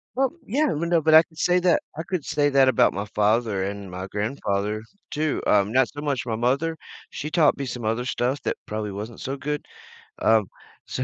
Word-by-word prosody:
Well, 265 +1 +2 0.2
yeah, 290 +8 +2
you 160 +3 -2
know, 170 -1 +2
but 155 +1 +3
I 160 +1 +9
could 160 -1 -24
say 180 +2 +3
that 180 -1 +3 0.2
I 160 - -3
could 175 -2 -3
say 145 +1 +1
that 135 -1 +5
about - - +4
my 100 - -3
father 105 -1 +1
and 100 -1 -6
my 90 +1 -6
grandfather 105 -1 -2 0.3
too, 155 -2 -1
uh, 100 -1 +4
not 125 +3 +2
so 145 - -9
much 145 -3 -1
my 115 -3 -2
mother. 140 +8 0 0.3
She 150 - -5
taught 155 -2 +3
me 140 - -3
some 120 -1 -5
other 115 +3 -1
stuff 130 +2 -1
that - - -1
probably 105 -1 -4
wasn't 105 +3 -7
so 135 - -4
good. 145 +2 -4 0.6
Um, 110 -3 +4 0.4
so - - -3
130 Hz, 210 wpm, -24 LUFS, 105-155 Hz, 0.6 s, I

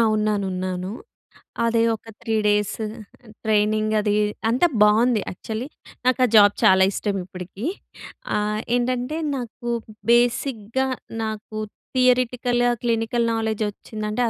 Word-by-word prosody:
ఉన్నాను. 210 -2 0
ఉన్నాను. 185 0 -3 0.8
అదే 230 0 +2
ఒక 225 - -11
3 225 -1 -2
డేస్ 210 0 +1 0.7
ట్రైనింగ్ 215 0 +2
అది 210 0 +1 0.3
అంతా 250 +9 +3 0.2
బాగుంది 220 +2 +4
యాక్చువలి. 220 +6 -5 0.4
నాకా 255 0 +4
జాబ్ 205 -1 +7
చాలా 190 0 +6
ఇష్టం 205 0 -2
ఇప్పటికి. 185 +5 -7 0.7
ఆహ్, 210 0 -1 0.2
ఏంటంటే 250 +4 -1 0.2
నాకు 240 0 -6 0.4
బేసిక్‌గా, 240 0 +2 0.4
నాకు 215 0 -5 0.4
థియరెటికల్‌గా 245 -1 +2
క్లినికల్ 230 0 +1
నాలెడ్జ్ 220 -1 -1
వచ్చిందంటే, 215 +2 -4
220 Hz, 105 wpm, -23 LUFS, 210-240 Hz, 0.8 s, జాబ్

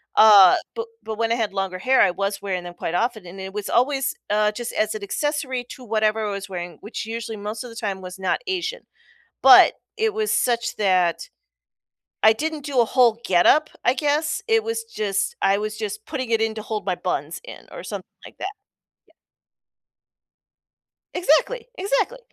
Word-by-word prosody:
Uh, 205 -4 +8 0.2
but 460 0 -4 0.2
but 220 - -5
when 230 0 0
I - - +3
had 225 -3 -1
longer 195 -2 -3
hair, 260 +7 +3
I - - +5
was 195 +2 -2
wearing 185 -3 -3
them 175 0 -8
quite 165 - -4
often, 225 -2 -1
and 190 +2 -9
it 190 - -6
was 210 -1 -4
always, 270 +2 +1 0.2
uh, 210 0 +2
just 240 +2 -6
as 215 0 0
an 215 - -6
accessory 265 +1 -2
to 255 - -10
whatever 215 -1 0
I - - -2
was 200 -1 -5
wearing, 175 -3 -6
which 215 +1 -6
usually 225 -1 -5
most 210 +3 -5
of 245 - -9
the - - -12
time 200 -4 -3
was 185 +1 -9
not 190 - 0
Asian. 380 +6 -3 0.6
But - - +8 0.2
it 440 -1 +1
was 430 0 0
such 235 -2 +1
that 185 - +1 1.0
I 220 - +7
didn't 310 +5 -3
do 275 -4 +1
a - - +3
whole 235 -2 +3
getup, 190 - +4
I 245 - +4
guess. 300 +3 0
It 450 -1 +3
was 455 0 -3
just 205 - -2
I 195 0 +4
was 215 0 -4
just 225 - -5
putting 260 -6 -4
it 225 -1 +2
in 220 0 0
to 215 - -5
hold 215 -1 -4
my 185 -2 0
buns 165 -4 -3
in - - -11
or - - -8
something - - -6 0.2
like - - -13
that. 380 - -3 0.6
Yep. - - -28 2.0
Exactly, 365 - +1
exactly. 460 +4 0
225 Hz, 190 wpm, -23 LUFS, 200-290 Hz, 2.0 s, Uh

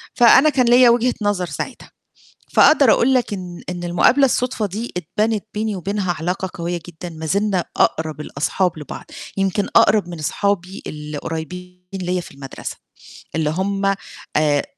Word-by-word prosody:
فأنا 260 +5 +7
كان 260 -4 +2
ليّا 245 +1 +6
وجهة 240 +1 +3
نظر 205 -3 0
ساعتها، 175 - -7 0.6
فأقدر 280 -6 +6
أقول 265 +3 +3
لك 250 -4 +1
إن 180 -3 -7
إن 175 -1 -5
المقابلة 175 +11 +4
الُصدفة 250 -4 0
دي 215 +5 -5
اتبنت 210 +5 -1
بيني 215 0 -2
وبينها 195 0 -2
علاقة 180 +3 -2
قوية 170 0 -3
جدًا 175 +1 -8
ما 160 -1 -8
زلنا 195 +1 0
أقرب 155 -2 +1
الأصحاب 155 +4 -1
لبعض، 150 - -8 0.3
يمكن 195 +1 +1
أقرب 205 -3 +5
من 170 - -7
أصحابي 190 +4 -2
اللي 150 0 -6
قريّبين 180 +4 -6
ليّا 180 -1 -2
في - - -12
المدرسة، 135 -1 -8 0.6
اللي 155 -2 +1
هُم 195 +3 0 0.4
آآ 150 -1 +2
185 Hz, 150 wpm, -20 LUFS, 165-215 Hz, 0.6 s, فأنا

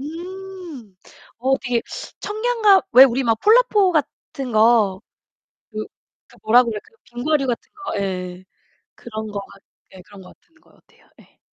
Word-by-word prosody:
음, 340 - -9 0.4
어 265 +3 +1
되게 245 -3 -1 0.4
청량감, 430 -2 +2
왜 260 +2 +10
우리 260 +1 +1
막 225 -3 +1
폴라포 430 -4 +4
같은 275 -4 -3
거 215 -3 +3 0.7
그 215 0 -5 0.4
그 - - -21
뭐라 245 +3 +5
그래, 220 -3 -4 0.2
빙과류 275 +4 -1
같은 240 -2 -4
거, 390 - -4
예, 185 -2 -4 0.5
그런 220 -2 -7
거 205 - -4
같 195 0 -13 0.3
예 185 - -12
그런 200 +1 -15
거 180 - -15
같은 330 - -38
것 - - -27
같아요. - - -28
네. - - -23
245 Hz, 235 characters per minute, -21 LUFS, 215-350 Hz, 0.7 s, 왜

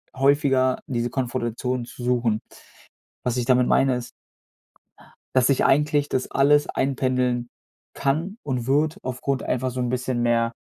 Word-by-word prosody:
häufiger 135 -1 +2
diese 120 -2 -1
Konfrontation 125 -1 -2
zu 125 - -10
suchen. 120 -3 +1 0.8
Was 125 0 0
ich 120 - 0
damit 125 -1 +4
meine, 135 -2 +3
ist 125 0 -6 1.3
dass 130 +1 +5
sich 135 - +2
eigentlich 150 +1 +2
das 130 - -2
alles 145 +2 +3
einpendeln 125 -2 0 0.4
kann 165 +10 -1
und 130 -3 -3
wird 155 +6 +2
aufgrund 130 +1 -2
einfach 130 0 -1
so 130 - -4
'n 125 - 0
bisschen 125 -1 -1
mehr 115 -1 +2
130 Hz, 140 wpm, -24 LUFS, 125-135 Hz, 1.3 s, dass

